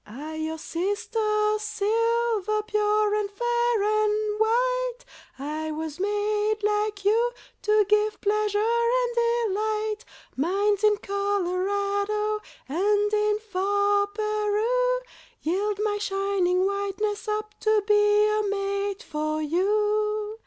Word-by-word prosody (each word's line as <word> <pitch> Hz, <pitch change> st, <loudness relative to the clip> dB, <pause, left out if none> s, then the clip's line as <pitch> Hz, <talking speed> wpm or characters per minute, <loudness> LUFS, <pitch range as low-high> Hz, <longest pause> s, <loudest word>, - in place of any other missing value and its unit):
I, 285 Hz, +9 st, -8 dB
your 315 Hz, 0 st, -3 dB
sister, 425 Hz, +5 st, -1 dB
Silver, 440 Hz, 0 st, 0 dB
Pure 425 Hz, 0 st, +1 dB
and 420 Hz, -1 st, 0 dB
fair 475 Hz, +1 st, 0 dB
and 425 Hz, 0 st, +1 dB
white, -, -, +1 dB, 0.3 s
I 305 Hz, +3 st, -4 dB
was 310 Hz, +1 st, -5 dB
made, 415 Hz, +1 st, 0 dB
like 420 Hz, -1 st, 0 dB
you, 460 Hz, +4 st, +3 dB, 0.3 s
to 425 Hz, -1 st, +3 dB
give 425 Hz, +1 st, +2 dB
Pleasure 420 Hz, 0 st, 0 dB
and 470 Hz, +2 st, +1 dB
delight. 435 Hz, -2 st, 0 dB, 0.4 s
Mines 395 Hz, +8 st, +1 dB
in 420 Hz, -1 st, +4 dB
Colorado, 405 Hz, +1 st, -1 dB, 0.3 s
And 410 Hz, +7 st, +1 dB
in 420 Hz, 0 st, +2 dB
far 405 Hz, 0 st, +1 dB
Peru, 430 Hz, +4 st, 0 dB, 0.4 s
Yield 395 Hz, +5 st, -1 dB
my 415 Hz, -1 st, 0 dB
shining 390 Hz, -2 st, +1 dB
whiteness 400 Hz, +2 st, -2 dB
up 425 Hz, 0 st, -3 dB
To 435 Hz, -1 st, +2 dB
be 420 Hz, -, +4 dB, 0.3 s
a 425 Hz, 0 st, +1 dB
mate 400 Hz, +1 st, -2 dB
for 310 Hz, 0 st, -2 dB
you. 420 Hz, +6 st, 0 dB
420 Hz, 110 wpm, -25 LUFS, 400-430 Hz, 0.4 s, in